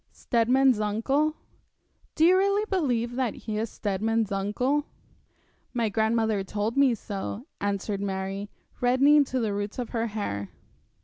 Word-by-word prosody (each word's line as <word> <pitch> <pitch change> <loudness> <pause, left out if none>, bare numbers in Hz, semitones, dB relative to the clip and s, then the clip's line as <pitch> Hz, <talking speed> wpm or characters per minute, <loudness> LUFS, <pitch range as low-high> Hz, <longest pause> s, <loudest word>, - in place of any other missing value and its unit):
'Steadman's 250 +1 +2
uncle?' 270 +9 +1 0.8
'Do 320 - +4
you 360 +2 +6
really 400 +2 +2
believe 245 -10 0
that 255 -5 0
he 215 -1 -4
is 225 0 -2
Steadman's 215 +2 -1
uncle?' 245 +9 0 0.9
'My 230 -2 +1
grandmother 220 -1 +1
told 210 +3 -2
me 275 -3 +4
so,' 205 +3 -5 0.2
answered 200 0 -2
Mary, 195 +1 -3 0.3
reddening 275 +4 +5
to 260 -1 -2
the 220 -4 -1
roots 205 +1 -4
of 245 -3 -3
her 230 0 -1
hair. 100 - -4
225 Hz, 135 wpm, -27 LUFS, 205-260 Hz, 0.9 s, you